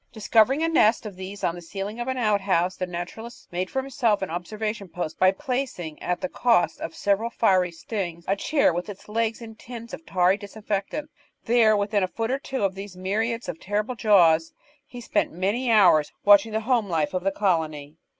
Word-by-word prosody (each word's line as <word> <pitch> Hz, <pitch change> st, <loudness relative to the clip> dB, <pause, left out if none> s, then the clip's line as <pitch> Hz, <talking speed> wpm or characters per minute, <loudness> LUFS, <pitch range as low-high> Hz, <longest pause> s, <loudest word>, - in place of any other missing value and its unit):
Discovering 230 Hz, +6 st, +3 dB
a -, -, +2 dB
nest 230 Hz, -8 st, +3 dB
of 205 Hz, -3 st, -7 dB
these 190 Hz, +2 st, -8 dB
on 170 Hz, -, +1 dB
the 175 Hz, -, -9 dB
ceiling 195 Hz, +6 st, -6 dB
of 240 Hz, -, -3 dB
an 260 Hz, 0 st, -2 dB
outhouse, 195 Hz, -5 st, +1 dB
the 185 Hz, -, -3 dB
naturalist 180 Hz, +7 st, -7 dB
made 180 Hz, +1 st, -2 dB
for 265 Hz, -, -2 dB
himself 235 Hz, -7 st, 0 dB
an 190 Hz, -, -4 dB
observation 210 Hz, +3 st, -4 dB
post 160 Hz, -2 st, -5 dB
by 185 Hz, -, +6 dB
placing, 245 Hz, -, -4 dB
at 180 Hz, 0 st, -2 dB
the 275 Hz, -, -1 dB
cost 235 Hz, -7 st, +1 dB
of 165 Hz, -, -5 dB
several 205 Hz, +3 st, 0 dB
fiery 185 Hz, -6 st, +2 dB
stings, 170 Hz, -1 st, -5 dB
a 195 Hz, -, +2 dB
chair 280 Hz, -, +2 dB
with 175 Hz, +4 st, -4 dB
its 200 Hz, -1 st, -10 dB
legs 225 Hz, +1 st, -1 dB
in 225 Hz, -1 st, -9 dB
tins 235 Hz, +1 st, -10 dB
of -, -, -5 dB
a -, -, -34 dB
tarry 185 Hz, -6 st, +2 dB
disinfectant. 210 Hz, +7 st, -4 dB, 0.3 s
There, 225 Hz, -2 st, +4 dB
within 205 Hz, 0 st, 0 dB
a 185 Hz, -, +1 dB
foot 225 Hz, +5 st, -3 dB
or 270 Hz, -, 0 dB
two 265 Hz, -4 st, -4 dB
of 195 Hz, -1 st, +1 dB
these 195 Hz, -1 st, -9 dB
myriads 220 Hz, +5 st, -2 dB
of 165 Hz, -, -5 dB
terrible 210 Hz, +5 st, -2 dB
jaws, 170 Hz, -8 st, +4 dB, 0.3 s
he 245 Hz, -1 st, -9 dB
spent -, -, -1 dB
many 205 Hz, +9 st, -1 dB
hours 175 Hz, -9 st, +5 dB
watching 205 Hz, +2 st, +6 dB
the 220 Hz, -, 0 dB
home 230 Hz, -3 st, +1 dB
life 160 Hz, -2 st, 0 dB
of 180 Hz, -1 st, -2 dB
the 195 Hz, -, +1 dB
colony. 160 Hz, -7 st, -1 dB
205 Hz, 205 wpm, -25 LUFS, 180-230 Hz, 0.3 s, by